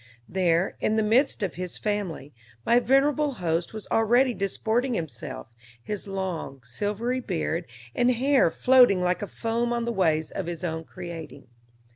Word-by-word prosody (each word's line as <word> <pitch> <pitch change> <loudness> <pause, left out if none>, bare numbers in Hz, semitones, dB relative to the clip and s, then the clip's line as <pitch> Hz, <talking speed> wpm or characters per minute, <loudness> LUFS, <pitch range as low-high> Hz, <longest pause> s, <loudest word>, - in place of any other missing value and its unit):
There, 180 -1 +1
in 215 - +1
the 220 - +2
midst 230 +2 +2
of 190 - -1
his 180 -1 -5
family, 195 -9 -3 0.3
my 240 +1 +5
venerable 280 +3 +2
host 170 -5 -1
was 215 -1 -8
already 240 +3 +3
disporting 225 +5 -1
himself, 150 -5 -5 0.4
his 210 - -5
long, 180 -9 -4
silvery 210 - -2
beard 175 -6 -2 0.3
and 245 - +2
hair 260 -3 +3
floating 245 -3 +5
like 180 -1 0
a 205 - -3
foam 230 +3 -2
on 235 -1 -1
the 235 - -1
waves 160 -6 +1
of 190 - -4
his 170 -1 -5
own 160 -2 -3
creating. 165 -7 -9
200 Hz, 155 wpm, -26 LUFS, 170-240 Hz, 0.4 s, my